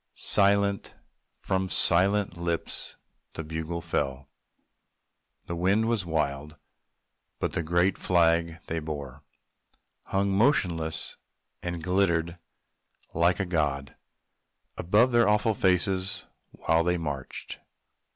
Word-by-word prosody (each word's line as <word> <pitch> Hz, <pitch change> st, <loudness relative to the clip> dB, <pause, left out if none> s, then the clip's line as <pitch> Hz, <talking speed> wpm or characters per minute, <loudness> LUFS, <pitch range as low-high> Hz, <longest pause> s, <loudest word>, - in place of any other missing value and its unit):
(Silent 100 Hz, 0 st, +2 dB, 0.4 s
from 95 Hz, -1 st, -2 dB
silent 95 Hz, +3 st, +3 dB
lips 85 Hz, -1 st, -2 dB, 0.4 s
the 80 Hz, -, -5 dB
bugle 80 Hz, +2 st, -4 dB
fell.) 70 Hz, -5 st, -3 dB, 1.1 s
The 85 Hz, -, -4 dB
wind 95 Hz, +6 st, +2 dB
was 110 Hz, -6 st, -1 dB
wild; 75 Hz, -2 st, -2 dB, 0.8 s
but -, -, -2 dB
the -, -, -1 dB
great 85 Hz, +4 st, +1 dB
flag 85 Hz, -2 st, +2 dB
they 80 Hz, -, -3 dB
bore, 75 Hz, -3 st, -7 dB, 0.8 s
Hung 100 Hz, 0 st, 0 dB
motionless, 90 Hz, -, +1 dB, 0.4 s
and 85 Hz, -2 st, -4 dB
glittered 85 Hz, -2 st, +1 dB, 0.7 s
like 85 Hz, +2 st, +2 dB
a 100 Hz, -, 0 dB
god 70 Hz, -6 st, -1 dB, 0.8 s
Above 105 Hz, +9 st, +3 dB
their 120 Hz, -3 st, +4 dB
awful 105 Hz, +1 st, +2 dB
faces 95 Hz, 0 st, +1 dB, 0.2 s
while 80 Hz, 0 st, +1 dB
they 90 Hz, +1 st, +1 dB
marched. 70 Hz, -5 st, -6 dB
85 Hz, 100 wpm, -27 LUFS, 80-95 Hz, 1.1 s, their